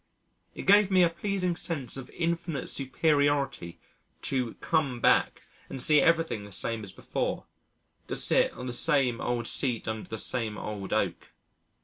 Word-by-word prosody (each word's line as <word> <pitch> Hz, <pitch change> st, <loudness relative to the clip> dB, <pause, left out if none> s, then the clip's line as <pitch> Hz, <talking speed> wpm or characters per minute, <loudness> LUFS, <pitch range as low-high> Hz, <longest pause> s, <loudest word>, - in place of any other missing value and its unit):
It -, -, -6 dB
gave 205 Hz, 0 st, +6 dB
me 185 Hz, -2 st, +5 dB
a 170 Hz, -, +3 dB
pleasing 180 Hz, 0 st, -1 dB
sense 145 Hz, -8 st, -3 dB
of 135 Hz, -2 st, -8 dB
infinite 165 Hz, -4 st, -2 dB
superiority 140 Hz, -, +1 dB, 0.4 s
to 125 Hz, -4 st, -1 dB
come 140 Hz, -7 st, 0 dB
back -, -, +3 dB, 0.3 s
and 135 Hz, -, -6 dB
see 150 Hz, +3 st, +5 dB
everything 165 Hz, -10 st, +2 dB
the 100 Hz, -, -11 dB
same 110 Hz, +3 st, -3 dB
as 95 Hz, -, -8 dB
before, -, -, -3 dB, 0.6 s
to -, -, -3 dB
sit -, -, +3 dB
on 125 Hz, -, -8 dB
the 125 Hz, -, -4 dB
same 130 Hz, -3 st, +1 dB
old 120 Hz, -1 st, -1 dB
seat 120 Hz, -2 st, -1 dB
under 110 Hz, -1 st, -4 dB
the 110 Hz, -, -4 dB
same 110 Hz, -2 st, -1 dB
old 100 Hz, -2 st, -6 dB
oak. -, -, -1 dB
135 Hz, 155 wpm, -28 LUFS, 115-165 Hz, 0.6 s, gave